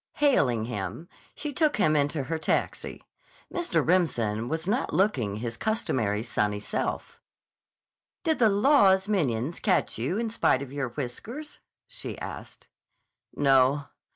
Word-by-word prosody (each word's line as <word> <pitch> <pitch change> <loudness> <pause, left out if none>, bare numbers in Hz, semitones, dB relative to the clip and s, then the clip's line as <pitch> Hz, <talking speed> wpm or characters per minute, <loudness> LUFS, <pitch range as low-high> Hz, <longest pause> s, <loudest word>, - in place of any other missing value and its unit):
Hailing 140 - +2
him, 105 - -5 0.3
she 295 -1 -4
took 310 -2 +2
him 155 -7 +3
into 145 0 +1
her 160 +4 -3
taxi. - - -2 0.5
Mr. 350 0 0
Remsen 120 - +1
was 160 +2 -3
not 235 +7 0
looking 130 - +1
his 115 +1 -5
customary 115 - -1
sunny 105 -3 -1
self. 105 - -4 1.0
"Did 320 -3 +1
the 225 -3 +5
law's 200 -3 +4
minions 150 - 0
catch - - +1
you 140 - -1
in 230 -1 -2
spite 140 -11 +2
of 135 -1 -10
your 140 -3 -2
whiskers?" 180 - -6 0.3
she - - -7
asked. - - -8 0.7
"No. 135 0 +3
145 Hz, 130 wpm, -27 LUFS, -, 1.0 s, the